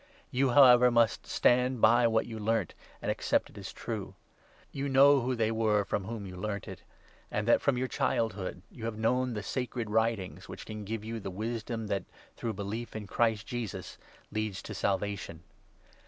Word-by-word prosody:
You, 135 +1 +2
however, 125 -2 +8
14 125 - +4
must 115 -2 +3
stand 125 0 +3
by 120 +2 +6
what 110 -1 +2
you 110 -2 -7
learnt 115 +2 0 0.3
and - - +1
accepted - - 0
as - - -7
true. - - -5 0.6
You 140 0 -3
15 140 - -2
know 140 +1 +7
who 125 +1 -1
they 110 -1 +1
were 110 -2 +2
from 100 -1 -2
whom 110 -1 -5
you 90 -1 -8
learnt 100 +1 -4
it; - - -8 0.5
and 105 +1 -2
that, 120 - +5
from 140 -3 +2
your 130 +1 0
childhood, 100 -7 -1
you 115 - -8
have 115 -2 -3
known 125 +2 +1
the 105 - -4
Sacred 120 -2 -3
Writings, 110 -3 0
which - - -8
can 110 -1 -7
give 110 +1 -4
you 115 0 -4
the 95 - -5
wisdom 110 +3 -4
that, 100 -2 -2 0.3
through 115 -2 -3
belief 105 +4 -5
in 110 -1 -5
Christ 110 +1 +1
Jesus, 120 -5 -5 0.3
leads 110 -3 -3
to - - -7
Salvation. 100 -4 -2
110 Hz, 185 wpm, -30 LUFS, 105-120 Hz, 0.6 s, however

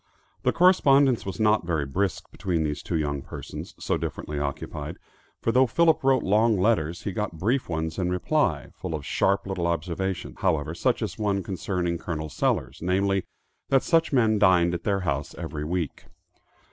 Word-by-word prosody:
The - - +2
correspondence 140 - +4
was 95 - -5
not 110 -2 +3
very 80 -4 0
brisk 95 +7 -2
between 90 -5 -1
these 75 -1 -2
two 85 - -3
young 70 -2 -1
persons, - - -8
so - - -1
differently 75 -1 -4
occupied; 70 -1 -4 0.5
for 115 - +2
though 130 +2 +4
Philip 160 +6 +3
wrote 135 -1 +3
long 110 +2 +3
letters, 90 -5 +1
he 100 - -2
got 95 -3 -3
brief 120 +9 0
ones 80 0 -2
in 90 -1 0
reply, 90 - 0
full 85 -3 -4
of 75 -3 -6
sharp 100 0 +1
little 95 -3 -2
observations 85 -4 -3
however, 80 -4 0
such - - 0
as - - -5
one 100 -2 0
concerning 90 -3 -2
Col. 80 -3 -4
Sellers, 65 -2 -1
namely, 95 +2 +1 0.4
that 135 -1 +4
such 165 -1 +2
men 110 -6 +3
dined 90 -3 +4
at 85 -1 -4
their 100 -2 +1
house 75 -5 -2
every 80 -3 -5
week. 85 -2 -3
90 Hz, 170 wpm, -26 LUFS, 80-110 Hz, 0.5 s, correspondence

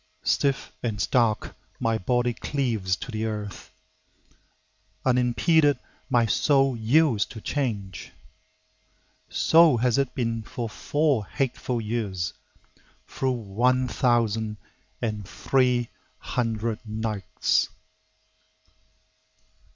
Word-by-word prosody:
Stiff 140 -1 +1
and 110 -4 -2
stark 115 -1 +1 0.2
my 115 0 +1
body 120 +5 +1
cleaves 115 -10 -1
to 125 - -8
the 110 0 -2
earth; 105 -2 -5 1.4
Unimpeded 130 +4 +3 0.3
my 120 -3 +4
soul 135 +3 +3
yields 120 0 +3
to 110 - -10
Change. 105 - -3 1.2
So 165 -5 +5
has 125 +2 +2
it 135 -2 -1
been 115 -2 -1
for 115 +2 -5
four 140 -1 0
hateful 125 -2 -2
years, 105 -6 -2 0.7
Through 135 - -1
one 125 +3 +1
thousand 115 -3 +1 0.5
and 105 -4 -3
three 125 -3 +1 0.3
hundred 115 -2 -2
nights! 110 -2 -1
120 Hz, 90 wpm, -26 LUFS, 110-130 Hz, 1.4 s, So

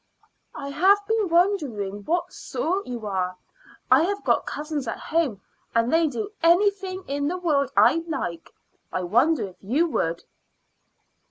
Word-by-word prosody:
"I 280 - -6
have 370 +8 +5
been 440 -4 +1
wondering 280 - +1
what 350 +2 -1
sort 370 +5 -3
you 240 -3 -5
are. 185 -2 -2 0.5
I 260 +3 +7
have 400 +4 -1
got - - +1
cousins 295 -3 -4
at - - -3
home, 300 - -1 0.3
and 230 +4 +2
they 325 0 +4
do 415 +7 -4
anything 375 +2 +2
in 285 +1 -1
the 360 +4 -1
world 290 -7 +1
I 330 - +5
like. 175 - -4 0.4
I 185 - -2
wonder 235 - +2
if 180 - -19
you 260 - +1
would." 165 - -1
300 Hz, 150 wpm, -24 LUFS, 230-355 Hz, 0.5 s, I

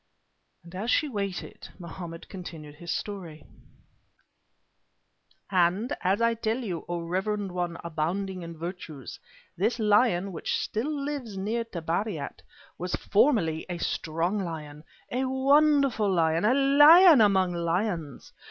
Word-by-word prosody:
As 205 +6 -4
she 305 - +2
waited, 200 -7 -5
Mohammed 170 -1 -8
continued 165 -6 -9
his 170 +3 -11
story: 175 -6 -5 2.1
"And, 190 +7 +2
as 195 +4 +1
I 230 0 +3
tell 225 0 -1
you, 195 -10 -5
O 175 -1 -2
reverend 190 +3 -2
one 175 -1 -3
abounding 175 +4 -3
in 170 -1 -8
virtues, 165 -5 -7 0.4
this 215 +7 0
lion 210 -3 +2
which 165 - -2
still 225 +7 -2
lives 280 -8 -4
near 220 +5 -1
Tabariat, 170 -4 -4 0.4
was 180 0 -2
formerly 200 - +2
a 175 - -3
strong 170 +4 -2
lion, 155 -5 -6 0.3
a 255 +2 0
wonderful 275 -4 +3
lion, 165 0 +2
a 245 +4 +4
lion 290 +3 +7
among 190 -4 +3
lions! 170 - -3
190 Hz, 120 wpm, -27 LUFS, 170-230 Hz, 2.1 s, lion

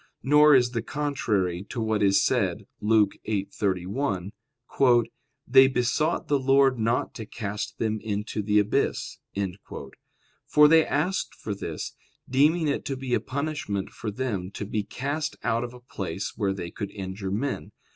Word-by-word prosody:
Nor 150 +2 +6
is 120 -2 +4
this 115 -2 -2
contrary 110 -11 -1
to 120 - -4
what 110 -1 0
is 100 -1 +4
said - - 0
(Luke 105 -1 +3 0.2
8:31), 100 0 -1 1.2
"They 130 +1 +7
besought 130 +5 0
the 145 -1 +2
Lord 135 -1 +4
not 115 +2 0
to 110 -3 -7
cast 105 -2 -5
them 110 -1 -1
into 105 0 -3
the 105 +1 +1
abyss"; 105 0 0 1.3
for 150 0 +7
they 160 +1 +6
asked 180 +6 -1
for 105 - -5
this, 100 - -5 0.3
deeming 150 +5 +3
it 140 - -1
to 135 - -3
be 130 -1 -3
a - - +4
punishment 140 -8 -3
for 110 - -5
them 105 -5 -3
to 105 - -4
be 105 +1 -1
cast 145 +8 -3
out 115 +1 +1
of 120 - -5
a - - -12
place 95 -7 -5
where 100 -3 0
they 85 -3 -6
could 100 - -5
injure 95 0 -5
men. 105 - -2
115 Hz, 155 wpm, -26 LUFS, 100-135 Hz, 1.3 s, They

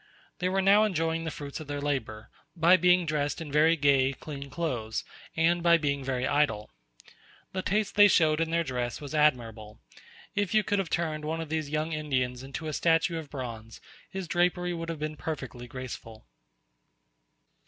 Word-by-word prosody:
They 180 - 0
were 190 +1 +1
now 200 +2 +6
enjoying 165 -5 0
the - - -1
fruits 145 -1 -7
of 155 - -9
their 145 0 -3
labour, 115 -7 -3 0.2
by 170 +2 +6
being 180 0 +4
dressed 150 -2 -1
in 160 -3 -7
very 155 +3 +4
gay, 140 -3 +3
clean 140 0 -8
clothes, 125 -9 -3 0.3
and 170 +2 +3
by 170 0 +5
being 140 -3 -1
very 130 -1 -1
idle. 120 -8 +1 0.8
The 185 - -2
taste 205 +2 0
they 205 0 +8
showed 160 -4 +3
in 165 - 0
their 170 +1 +1
dress 125 -4 -3
was 145 0 -8
admirable; 115 -8 0 0.5
if 205 0 -1
you 215 - +5
could 205 -1 0
have 190 -4 -2
turned 155 -3 -1
one 160 +2 -2
of 165 -2 -5
these 155 -2 -2
young 155 +2 -1
Indians 130 -5 -1
into 135 +3 -7
a 155 - -3
statue 165 +1 +2
of 155 -3 -9
bronze, 115 -5 -7 0.3
his 190 -2 -5
drapery 180 +1 +1
would 165 -1 -5
have 165 - -3
been 155 0 -4
perfectly 130 -7 -6
graceful. 120 -3 -8
155 Hz, 180 wpm, -28 LUFS, 135-170 Hz, 0.8 s, they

